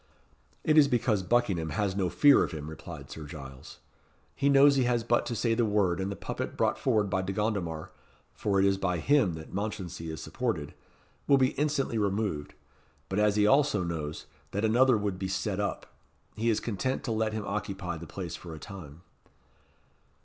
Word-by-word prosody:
"It 155 0 +5
is 145 - +6
because 120 -5 +1
Buckingham 95 -6 +1
has 95 +5 -1
no 95 -3 0
fear 145 +7 +6
of - - -4
him," 75 -1 -6
replied 80 -3 -9
Sir 80 - -7
Giles. 70 -4 -10 0.6
"He 140 +1 +2
knows 140 +1 +6
he 130 -2 +2
has 120 -1 +1
but 120 +1 +1
to 120 - -2
say 115 +1 +1
the 120 +1 +2
word, 100 -5 +1
and 95 +1 -2
the - - -4
puppet - - -5
brought - - +1
forward 110 -6 +2
by 95 -1 0
De 95 +1 -3
Gondomar 95 -6 -2 0.4
for 100 -2 0
it 95 - +4
is 95 -1 +2
by 90 -3 0
him 130 - +3
that 80 0 -9
Mounchensey 95 -5 -4
is 80 - -5
supported 80 -3 -3 0.5
will 140 - +6
be 130 -1 +4
instantly 140 -6 -1
removed; 100 -7 -1 0.5
but 95 - -1
as 105 -1 +3
he 105 -1 +4
also 135 -5 +3
knows, 80 -3 -4 0.3
that 100 +3 0
another 120 +2 +4
would 100 -3 -2
be 95 - -2
set 95 +1 -2
up, 100 - -3 0.4
he 115 +2 0
is 110 - +2
content 120 +4 -2
to 115 - -2
let 110 -1 0
him 110 -2 -3
occupy 95 -3 -3
the 80 +1 -8
place 85 0 -6
for 85 -3 -9
a - - -10
time." 85 -5 -10
100 Hz, 195 wpm, -29 LUFS, 85-115 Hz, 0.6 s, is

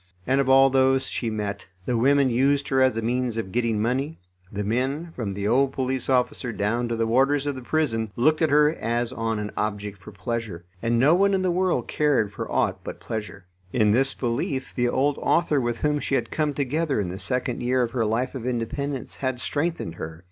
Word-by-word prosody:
And 135 +2 +2
of 135 - -1
all 135 0 +6
those 130 0 +3
she 115 - -3
met, 105 -2 -4 0.2
the 125 - 0
women 140 +4 +4
used 140 +3 +2
her 130 -1 +2
as 130 -4 +3
a 115 - -2
means 120 0 -1
of 95 -4 -3
getting 115 -1 0
money, 130 +8 -1 0.3
the 105 +1 -3
men, 135 +10 -1
from 105 -5 -3
the 100 +1 -2
old 135 +4 +3
police 130 0 -2
officer 125 -1 +1
down 115 +3 -1
to 115 - -2
the 115 0 0
warders 135 +5 +2
of 145 - -1
the 130 - -8
prison, 120 -6 -1
looked 155 +7 +2
at 160 - +3
her 150 +1 +4
as 120 -3 -2
on 115 -3 -2
an 105 0 -4
object 105 -1 -3
for 105 - -11
pleasure. 100 -3 -4 0.2
And 115 0 +1
no 135 +7 +5
one 195 +2 +3
in 190 - 0
the 185 - +2
world 180 -8 0
cared 135 -9 +1
for - - -6
aught - - +1
but - - -7
pleasure. 105 -3 -6 0.3
In 105 -3 +3
this 135 +4 +3
belief 130 +2 -2
the 120 -1 +1
old 140 +3 +1
author 155 -4 +2
with 120 -1 -1
whom 150 +2 0
she 140 - -1
had - - -1
come 150 -2 -1
together 145 0 0
in 95 -4 -1
the 95 +2 -6
second 125 +5 -2
year 125 +1 +2
of 115 - -2
her 120 -2 0
life 115 +4 -1
of 125 -3 -5
independence 125 +3 -3
had 130 -2 -2
strengthened 145 - -2
her. 80 -1 -7
125 Hz, 220 wpm, -25 LUFS, 115-140 Hz, 0.3 s, all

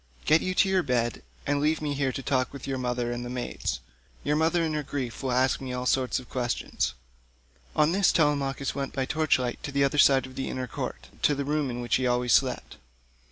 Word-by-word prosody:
Get 155 +1 +5
you 185 0 -2
to 195 - +4
your 190 -1 +3
bed, 120 -5 0 0.2
and 145 0 +1
leave 155 +2 +2
me 150 -2 -2
here 140 -1 0
to 135 - -5
talk 130 -1 0
with 140 -2 -8
your 135 -1 -2
mother 125 -1 -1
and 120 0 -3
the 120 - -5
maids. 125 -1 -3 0.4
Your 150 - +1
mother 165 +2 +2
in 160 -1 -1
her 150 - 0
grief 135 -4 -4
will 130 -2 -1
ask 130 +2 +2
me 130 -1 -4
all 125 0 -3
sorts 130 0 +1
of 130 - -7
questions." 120 - -2 0.8
On 155 +1 +4
this 195 +1 +4
Telemachus 140 -3 +1
went 140 -1 -4
by 135 -1 -1
torch 155 +2 +2
light 125 -2 -3
to 145 - -5
the 140 0 +2
other 140 +1 +1
side 135 -2 +6
of 130 - -11
the 135 - -3
inner 130 -1 -3
court, 120 - -6
to 145 - +3
the 140 0 -2
room 150 -1 0
in 120 0 -4
which 120 - +1
he 130 -1 0
always 125 0 +2
slept. 130 -1 +1
135 Hz, 235 wpm, -27 LUFS, 125-150 Hz, 0.8 s, side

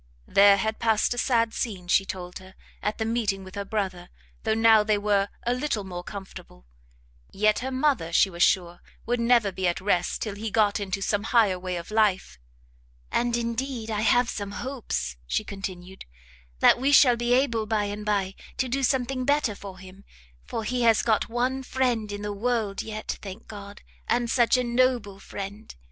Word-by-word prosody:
There 200 0 +6
had 220 +2 -2
passed 225 0 +2
a 245 - -3
sad 230 -3 +2
scene, 190 -7 -4
she 195 +2 +3
told 180 -1 -6
her, 190 0 -15 0.3
at 210 - -2
the 220 - -2
meeting 220 -4 -1
with 185 0 -12
her 200 - -4
brother, 190 -4 -3 0.3
though 220 -1 0
now 225 -1 +6
they 210 -1 +2
were 205 -1 +1 0.2
a 240 - +2
little 250 -5 -2
more 180 -2 -7
comfortable; 190 - -10 0.7
yet, 215 +2 +2
her 260 - -3
mother, 260 - 0
she 180 - +5
was 175 -2 -7
sure, 175 -2 +2 0.3
would 245 +1 0
never 235 -3 +3
be 185 0 -1
at 175 - 0
rest 180 -2 0
till 215 - -4
he 215 +2 -5
got 210 -1 +2
into 195 -1 -3
some 205 0 0
higher 215 -6 +3
way 180 0 -4
of 170 +3 -7
life; 205 - +1 0.7
"And, 240 0 +1
indeed, 235 0 -3
I 210 -1 -1
have 240 +3 +3
some 200 -3 -5
hopes," 135 - -4
she - - 0
continued, 190 -2 -7 0.6
"that - - +6
we 270 +3 +2
shall 260 -3 +7
be 240 +1 0
able 235 -5 +1
by 215 -1 +1
and 205 +1 -4
bye 200 -2 0 0.2
to 260 - 0
do 270 +3 -1
something 260 -1 0
better 285 -4 +1
for 195 -2 -10
him; 190 +1 -13 0.4
for 225 - -4
he 250 +3 -1
has 230 -2 +4
got 225 0 +1
one 250 +3 -1
friend 245 -5 -1
in 205 0 -5
the 205 0 -3
world, 220 -1 -1
yet; 215 -1 -5
thank 200 +2 -9
God, 200 -1 -10 0.2
and 240 -1 +1
such 240 0 +4
a 250 - +1
noble 240 -5 +1
friend! 200 +2 -8
215 Hz, 190 wpm, -26 LUFS, 195-240 Hz, 0.7 s, shall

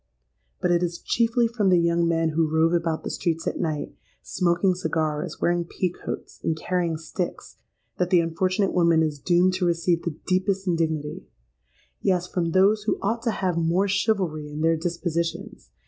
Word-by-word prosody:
But 180 - +1
it 175 0 +3
is 170 -1 -2
chiefly 230 +3 +1
from 225 -4 0
the 180 - +5
young 170 0 +2
men 165 -1 +1
who 160 0 +1
rove 160 +2 +2
about 165 -2 0
the - - -4
streets 165 -1 -2
at - - -2
night, 155 -4 -2 0.3
smoking 180 +1 +1
cigars, 160 -4 -2
wearing 175 0 +1
pea 180 +1 -2
coats, - - -7
and 160 - 0
carrying 170 -1 -1
sticks, 170 +3 -5 0.4
that 180 -1 +1
the 180 -2 +5
unfortunate 185 +4 0
woman 170 -2 +4
is 150 -2 -2
doomed 180 +4 +3
to 185 - 0
receive 170 0 +1
the 165 -3 -4
deepest 190 +1 0
indignity:—yes, 155 - -3
from 170 -2 -1
those 195 +5 +4
who - - +1
ought 230 +4 0
to 230 - 0
have 185 -5 -1
more 170 +4 +2
chivalry 190 -7 0
in 150 +1 -6
their 165 +1 +3
dispositions! 170 +5 -3
170 Hz, 170 wpm, -25 LUFS, 165-185 Hz, 0.4 s, the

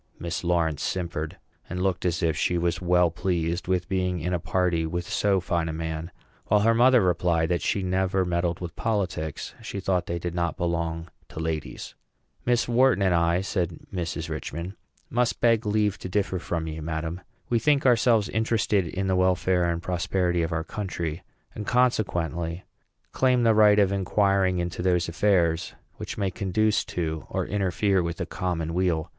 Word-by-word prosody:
Miss 85 0 -4
Lawrence 85 -4 +1
simpered, 85 -4 -3 0.3
and 90 - -4
looked 95 -2 0
as 85 +1 -1
if 80 -2 +2
she 90 - +1
was 85 +1 0
well 90 -1 +3
pleased 85 0 -1
with 90 -1 0
being 90 -2 -1
in 90 +3 -2
a 90 - +1
party 90 -1 0
with 85 +2 -3
so 100 -2 +2
fine 85 -2 -1
a - - -3
man; 80 0 -4 0.4
while 105 0 +4
her 115 +2 +4
mother 125 +1 +5
replied 85 -2 +1
that 85 - 0
she 100 - 0
never 95 0 +1
meddled 85 -1 -1
with 85 -2 -6
politics. 90 -9 -2
"Miss 100 -1 -6 2.8
Wharton 120 -3 +3
and 95 -2 +3
I," 85 +1 +2
said 90 -4 -2
Mrs. 85 -2 -3
Richman, 85 +3 -5 0.4
"must 125 -1 +1
beg 115 -2 +3
leave 105 -1 +1
to 95 - -6
differ 95 -1 0
from 85 -1 -3
you, 80 0 -5
madam. 80 +2 -4 0.3
We 120 - +2
think 145 +3 +2
ourselves 115 -4 +4
interested 110 -4 +1
in 95 +4 -3
the 95 -1 +1
welfare 90 -1 +2
and 85 0 -2
prosperity 90 0 0
of 80 +1 -1
our 80 0 -1
country; 85 -4 -4 0.3
and, 105 - -6
consequently, 90 -9 0 0.5
claim 125 -2 +2
the 115 -1 +5
right 105 -1 +6
of 100 -2 +4
inquiring 95 -1 +2
into 85 0 -3
those 90 -1 +2
affairs 85 -2 +1 0.2
which - - -6
may 100 -3 0
conduce 105 +3 +1
to 80 -2 -3
or - - -1
interfere 100 0 +1
with 85 0 -3
the 90 - -3
common 85 -3 -3
weal. 85 -3 0
90 Hz, 160 wpm, -26 LUFS, 85-100 Hz, 2.8 s, right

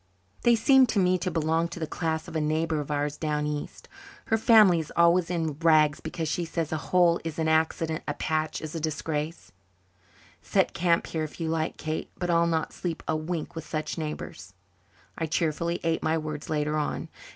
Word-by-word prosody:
"They 240 0 +5
seem 265 +3 +5
to 215 - 0
me 180 -1 +3
to 185 - -1
belong 165 0 +1
to 170 0 -8
the 160 - -1
class 160 0 -2
of - - -9
a 160 - +1
neighbour 155 +1 0
of 145 - -5
ours 145 0 -1
down 150 -1 -1
east. 150 -1 -5 0.4
Her 225 - +2
family 210 -6 +6
is 155 - -6
always 170 +1 +4
in 160 -4 -2
rags, 155 -3 +4
because 160 0 -4
she 170 +3 -1
says, 165 -1 -3
'a 160 - 0
hole 175 -2 +4
is 165 -2 -5
an 160 -1 0
accident, 160 0 +1
a 145 - -2
patch 155 -1 -1
is 155 - -6
a 165 - -3
disgrace,' 155 +1 -3 0.9
Set - - +1
camp 170 -1 +2
here 160 -1 -3
if 155 - -7
you 165 -1 -2
like, 160 -1 -1
Kate. 155 0 -4
But 175 -1 -1
I'll 170 0 +3
not 160 -1 -1
sleep 170 -3 -4
a 160 - +1
wink 155 +1 -3
with 165 -2 -7
such 155 +1 -3
neighbours." 100 - -6 0.6
I 165 - -1
cheerfully 170 +2 -1
ate 165 -1 0
my 160 +1 +1
words 155 -1 -5
later 150 0 0
on. 150 - -3
160 Hz, 200 wpm, -27 LUFS, 155-170 Hz, 0.9 s, family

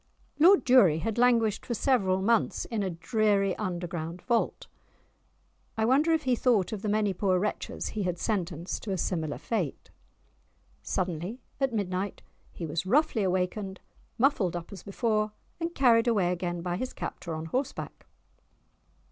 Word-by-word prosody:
Lord 370 +6 +7
Durie 225 -12 +6
had 225 +6 -2
languished 230 -4 +3
for 235 - -3
several 190 -8 +2
months 230 +1 +1
in 225 -3 -2
a 195 - -1
dreary 195 +2 +1
underground 175 -3 -4
vault. 235 -2 0 1.1
I 220 - +2
wonder 280 +7 +3
if 320 -1 +2
he 255 -2 +2
thought 225 -7 +2
of 215 -3 -4
the 210 - -2
many 210 -1 +1
poor 185 0 +1
wretches 205 +3 -3
he 215 - -4
had 180 -2 -1
sentenced 175 -5 -2
to 210 - -5
a 190 - 0
similar 160 -4 -2
fate? 190 - -3 0.9
Suddenly 180 +6 -3 0.2
at 270 -2 +1
midnight 195 -2 -2 0.3
he 170 - -6
was 160 +4 -3
roughly 280 0 +3
awakened, 190 +1 -1 0.4
muffled 230 - +2
up 175 +3 -6
as 195 - -9
before, 215 0 -1 0.3
and 335 0 -3
carried 240 -3 +4
away 200 -7 +2
again 175 -1 -3
by 175 0 -2
his 255 +4 -4
captor 165 -3 -5
on 160 +1 -5
horseback. 260 - -4
200 Hz, 155 wpm, -28 LUFS, 180-235 Hz, 1.1 s, Lord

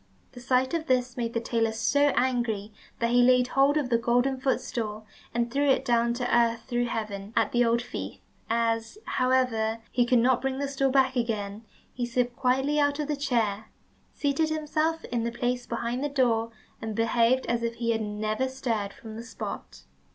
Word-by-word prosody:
The 245 - -11
sight 255 +2 +1
of 330 -1 -2
this 255 -1 +1
made 235 -2 -3
the - - +2
tailor 230 -1 0
so 285 +6 +2
angry 235 -5 0 0.2
that 235 0 0
he 245 0 +5
laid 250 0 +4
hold 275 +2 +3
of 270 -5 -1
the 235 - +4
golden 245 +3 +1
footstool, 220 -5 -2 0.3
and 235 0 -1
threw 285 0 +2
it 270 0 +2
down 235 -1 +2
to 245 -1 0
earth 230 -1 +2
through 240 0 -1
heaven, 210 -3 -4
at 225 -2 +2
the 240 0 +3
old 235 0 +2
thief. - - -6 0.3
As, 230 - 0
however, 250 -4 +1
he 245 -1 +2
could 250 - +4
not 245 +1 +3
bring 265 0 -1
the 280 +1 -1
stool 275 -1 0
back 265 0 +3
again, 220 -3 -2 0.3
he 245 -1 -3
slipped 245 0 -1
quietly 265 +4 +1
out 285 0 +2
of 300 -1 -3
the 300 - +1
chair, 230 -7 0 0.5
seated 290 +2 +1
himself 315 +1 -1
in 235 -1 -2
his 235 +1 -4
place 245 0 -1
behind 235 +3 -2
the 290 - 0
door, 235 -5 +1 0.3
and 220 -1 -4
behaved 230 +3 +2
as 235 0 0
if 235 0 -2
he 230 -1 -1
had 225 -1 0
never 215 +4 -1
stirred 230 -6 -2
from 220 -1 -10
the 230 - -7
spot. 230 - -7
240 Hz, 195 wpm, -27 LUFS, 230-260 Hz, 0.5 s, he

